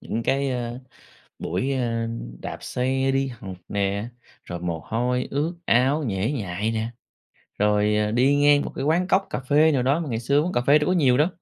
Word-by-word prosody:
những 115 - -3
cái, 135 +2 0
ơ, 120 -1 -3 0.6
buổi, 95 +11 -2
ơ, 115 -2 -1 0.3
đạp - - -6
xe 130 +1 0
đi 135 0 +1
học 100 -7 -8
nè, 100 +2 -1 0.4
rồi 85 -1 -6
mồ 85 -2 -3
hôi 125 +2 -1
ướt 155 +5 -1
áo 135 +6 +3
nhễ 100 +5 -1
nhại 105 -4 -2
nè, 110 +1 -2 0.7
rồi, 105 0 +2
à, 105 0 +1
đi 130 +5 +3
ngang 145 0 +5
một - - -6
cái 135 - -2
quán 170 +4 +2
cóc 195 0 +2
cà - - -3
phê 150 +4 +3
nào 130 - +1
đó, 140 +6 +2
mà 160 - -4
ngày 115 -1 -2
xưa 140 +5 +2
uống 180 - -2
cà 120 - +1
phê 145 +2 +6
đâu 150 - -1
có - - +3
nhiều 135 -8 +3
đâu. 150 +5 +3
125 Hz, 210 wpm, -24 LUFS, 110-145 Hz, 0.7 s, phê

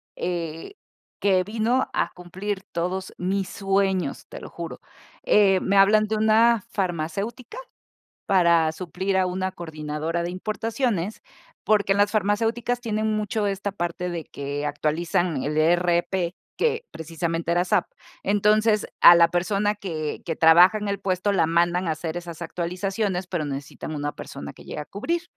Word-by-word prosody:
eh, 170 - -4 0.5
que 190 -2 +3
vino 230 +5 0
a 170 - 0
cumplir 190 +3 -5
todos 185 +2 -3
mis 190 +1 -1
sueños, 195 -1 -1
te - - -8
lo - - -9
juro. - - -7 0.4
Eh, 195 -3 +4
me 200 +1 +1
hablan 210 +2 +6
de 220 - -1
una 220 0 +4
farmacéutica 195 - -3 0.7
para 170 -5 +4
suplir 185 +3 -2
a 190 - +3
una 185 +1 -2
coordinadora 160 0 -4
de 175 - -3
importaciones, 215 0 -2 0.4
porque 205 -2 +2
en 195 - +3
las 205 0 +3
farmacéuticas 225 +4 0
tienen 215 -2 -1
mucho 215 0 -1
esta 200 0 -2
parte 175 -1 -3
de 170 -2 -4
que 145 +1 -5
actualizan 155 +1 -1
el 150 +1 -2
ERP, 175 +2 +2 0.2
que 465 +1 0
precisamente 165 +1 -3
era 175 +1 +3
SAP. - - +2 0.4
Entonces, 210 +2 +3
a 175 - +10
la 170 -1 +6
persona 200 +4 +1
que 160 -7 -4
que 165 - -3
trabaja 175 +6 +6
en 210 -1 -4
el 200 0 -2
puesto 190 +1 0
la 165 -5 +2
mandan 175 +2 +1
a - - +1
hacer 160 +1 -4
esas 170 -1 -8
actualizaciones, 185 +3 -2
pero 170 -5 -2
necesitan 140 +2 -6
una 145 0 -2
persona 70 0 -8
que - - -15
llegue - - -7
a 150 - -5
cubrir. 335 - -3
185 Hz, 155 wpm, -24 LUFS, 170-205 Hz, 0.7 s, a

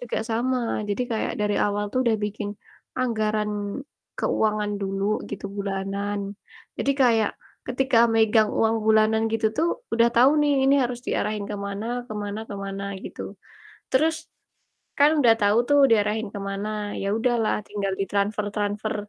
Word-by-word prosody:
juga 245 -2 -3
sama. 250 +3 +1 0.3
Jadi 205 +4 0
kayak 220 - -1
dari 210 0 +1
awal 205 0 +1
tuh 255 - +1
udah 230 -2 +3
bikin 210 0 -4 0.5
anggaran 215 -4 0 0.7
keuangan 210 -1 0
dulu 195 0 -2 0.2
gitu, 200 - -7
bulanan. 200 +1 -2 0.6
Jadi - - +1
kayak 230 -6 +3 0.4
ketika 255 -1 +1
megang 220 -1 +4
uang 225 0 +2
bulanan 220 0 +4
gitu 225 0 +1
tuh 325 +3 +2 0.2
udah 230 +1 +4
tau 250 +3 +6
nih 290 -2 +3
ini 280 - +6
harus 245 -1 -3
diarahin 210 -4 -2
ke 205 - -3
mana 230 +5 -4
ke - - -6
mana 205 0 -4
ke 205 - -7
mana 195 0 -5 0.2
gitu, - - -7 0.6
terus 315 +4 +1 0.7
kan 290 +2 +6
udah 235 -4 +6
tau 205 +2 +4
tuh 290 0 +5
diarahin 220 0 +2
ke - - -4
mana, 200 +1 -3 0.3
ya 195 - -2
udahlah 235 -2 +1
tinggal 200 -1 -2
di - - +2
transfer-transfer 205 +1 -1
215 Hz, 150 wpm, -24 LUFS, 205-240 Hz, 0.7 s, tau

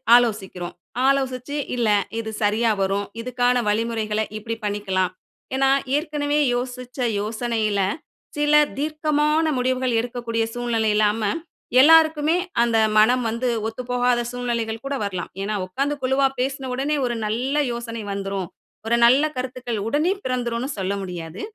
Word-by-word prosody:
ஆலோசிக்கிறோம். 200 -7 0 0.3
ஆலோசிச்சு, 270 0 0 0.2
இல்ல 235 -3 +1 0.3
இது 220 -1 -4
சரியா 220 +2 +2
வரும், 195 +1 0 0.2
இதுக்கான 245 0 +1
வழிமுறைகள 220 0 0
இப்படி 225 +1 -4
பண்ணிக்கலாம். 195 -3 -1 0.4
ஏன்னா 270 0 +3 0.3
ஏற்கனவே 295 -1 -1 0.2
யோசிச்ச 250 +1 -5 0.2
யோசனையில 215 -1 -1 0.6
சில 295 0 +2 0.2
தீர்க்கமான 305 +1 +1
முடிவுகள் 255 -1 +1
எடுக்கக்கூடிய 235 -1 -2
சூழ்நிலை 235 -2 0
இல்லாம, 215 +1 +2 0.6
எல்லோருக்குமே 320 +1 +5 0.2
அந்த 235 -1 +2 0.2
மனம் 245 +4 +5
வந்து 235 +3 -1 0.2
ஒத்துப்போகாத 245 +1 0
சூழ்நிலைகள் 235 -2 -3
கூட 275 0 -2
வரலாம். 185 -4 -4
ஏன்னா 205 +2 -2
உட்கார்ந்து 275 +10 -1
குழுவா 265 +1 +3
பேசுன 265 +1 -2
ஒடனே 280 +4 0
ஒரு 240 -1 -1
நல்ல 250 +7 -1
யோசனை 230 -1 -5
வந்துரும். 195 -2 -3 0.4
ஒரு 235 - +3
நல்ல 260 +5 +5
கருத்துக்கள் 255 -3 -4
உடனே 300 +9 +2
பிறந்துடும்னு 245 0 -2
சொல்ல 190 +1 -1
முடியாது. 175 +1 -6
240 Hz, 125 wpm, -23 LUFS, 215-265 Hz, 0.6 s, எல்லோருக்குமே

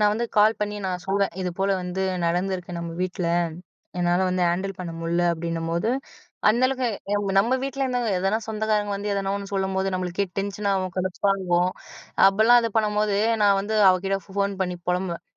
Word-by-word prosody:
நான் 210 -1 +4
வந்து 235 +3 -1
கால் 215 +2 +5
பண்ணி 210 0 -2
நான் 180 -1 -3
சொல்வேன். 195 0 +1
"இதுபோல 185 +2 -1
வந்து 180 +1 -3 0.2
நடந்திருக்கு 180 0 -2
நம்ம 170 0 -5
வீட்ல. 180 -1 -2 0.7
என்னால 175 0 +2
வந்து 185 0 0
ஹேண்டில் 190 +2 -2
பண்ண 175 -2 -5
முடில" 170 +1 0
அப்படின்னும்போது 165 +4 -2 0.6
அந்த 235 +4 +3
அளவுக்கு 260 -1 -1 0.3
எ - - +3 0.2
நம்ம 230 +6 +3
வீட்ல 275 0 -3
இருந்தவங்க, 245 -3 0
எதனா 195 +3 +1
சொந்தக்காரங்க 215 -1 0
வந்து, 205 +1 -3
எதனா 195 0 -1
ஒண்ணு 200 -1 -7
சொல்லும்போது, 190 0 0
நம்மளுக்கே 185 +2 -1
டென்ஷன் 200 +1 -2
ஆவும். 185 -2 -1
கடுப்பாகும். 185 -1 +1 0.6
அப்படிலாம் 220 +5 +6
இது 230 - 0
பண்ணும்போது, 210 -1 +1 0.3
நான் 200 -1 +5
வந்து 210 +2 -3
அவகிட்ட 190 +1 +2
ஃபோன் 200 +1 -1
பண்ணி 180 -1 0
பொலம்புவேன். 180 -1 -1
195 Hz, 165 wpm, -24 LUFS, 180-210 Hz, 0.7 s, அப்படிலாம்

